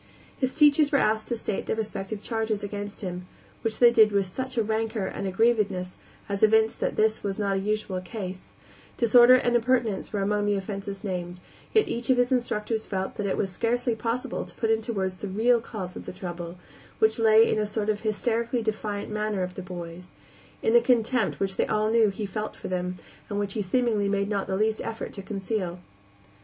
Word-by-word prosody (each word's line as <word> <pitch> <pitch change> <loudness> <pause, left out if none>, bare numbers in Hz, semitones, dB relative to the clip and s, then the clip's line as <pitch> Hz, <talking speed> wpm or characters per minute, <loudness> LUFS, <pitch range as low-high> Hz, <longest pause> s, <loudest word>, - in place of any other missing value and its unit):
His 260 -1 -1
teachers 295 -1 +5
were 280 - +4
asked 215 -3 +1
to 240 - -1
state 220 -3 -3
their - - 0
respective 215 -1 -4
charges 220 -2 -2
against 205 0 -5
him, 180 -2 -5 0.3
which 225 -2 -1
they 240 -1 +7
did 220 -2 +6
with 200 -1 +2
such 260 +7 -4
a 225 - +3
rancor 220 -1 -1
and 195 - -4
aggrievedness 195 -3 +1 0.3
as 200 -1 -3
evinced 220 +1 +4
that - - -1
this 220 0 +2
was 195 -1 -3
not 200 -2 0
a - - 0
usual 205 -2 -2
case, 185 0 -7 0.5
Disorder 240 +2 +7
and 240 -1 +2
impertinence 235 -4 +1
were 205 -2 -1
among 205 +1 0
the 205 - +2
offenses 195 0 -5
named, 180 -2 -4 0.3
yet 435 - +3
each 235 +1 -3
of 260 - +5
his 245 +1 +2
instructors 225 -3 0
felt 190 -1 -3
that 210 - -1
it 190 - -1
was 195 -2 -1
scarcely 240 +4 0
possible 230 +2 -2
to - - -13
put 225 -2 0
into 225 +1 0
words 190 -3 -2
the 205 - -5
real 225 +5 +3
cause 190 -5 -6
of - - -9
the - - -5
trouble, 175 -1 -6 0.4
which 220 +1 +3
lay 225 0 +6
in - - +1
a 210 - +1
sort 210 0 -2
of 215 -1 +1
hysterically 230 +3 -1
defiant 215 -1 -3
manner 210 -2 -1
of 180 0 -4
the 190 - -6
boy's; 180 -1 -8 0.5
in 450 - +2
the 475 - +7
contempt 245 - +1
which 190 -1 -1
they - - +1
all 215 0 +1
knew 225 -2 +4
he 200 +2 -4
felt 210 +2 -4
for - - -7
them, 180 0 -2 0.3
and 205 - -3
which 200 -1 -1
he 215 - -1
seemingly 210 0 +1
made 200 0 0
not 200 -2 -1
the 190 - -1
least 215 +1 +1
effort 225 0 -5
to 200 - -6
conceal. 195 -2 -3
215 Hz, 210 wpm, -26 LUFS, 195-230 Hz, 0.5 s, they